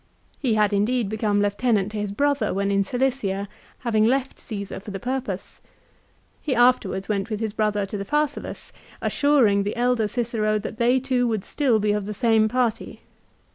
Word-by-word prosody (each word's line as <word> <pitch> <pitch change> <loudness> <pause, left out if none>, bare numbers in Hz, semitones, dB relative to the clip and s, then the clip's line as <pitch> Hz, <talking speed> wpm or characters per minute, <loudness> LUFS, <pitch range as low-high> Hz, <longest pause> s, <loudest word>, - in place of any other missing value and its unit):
He 245 -6 +1
had 210 -1 +2
indeed 215 +2 +1
become 210 -1 +1
lieu 205 - +2
tenant 210 -2 0
to 215 - -4
his 205 -1 -3
brother 280 -2 0
when 200 +1 0
in 200 0 +2
Cilicia, 210 -4 -1 0.3
having 220 -3 +2
left 265 +4 +1
Caesar 200 -4 -6
for 200 - -10
the 195 -1 -5
purpose. 245 -5 -4 0.8
He 275 -4 -1
afterwards 235 -6 +2
went 205 0 -1
with 215 -2 -3
his 220 -2 -2
brother 210 -2 0
to 200 +1 -5
the - - -2
Pharsalus, 295 +5 -2 0.3
assuring 260 -9 +3
the 205 +1 -2
elder 245 -2 +1
Cicero 215 -1 0
that 215 +1 -6
they 245 +3 +3
two 255 -2 0
would 220 -4 -1
still 255 -7 +1
be 210 0 +1
of 205 -1 -1
the 210 - -4
same 225 -1 +3
party. 240 -2 -1
220 Hz, 180 wpm, -24 LUFS, 205-250 Hz, 0.8 s, assuring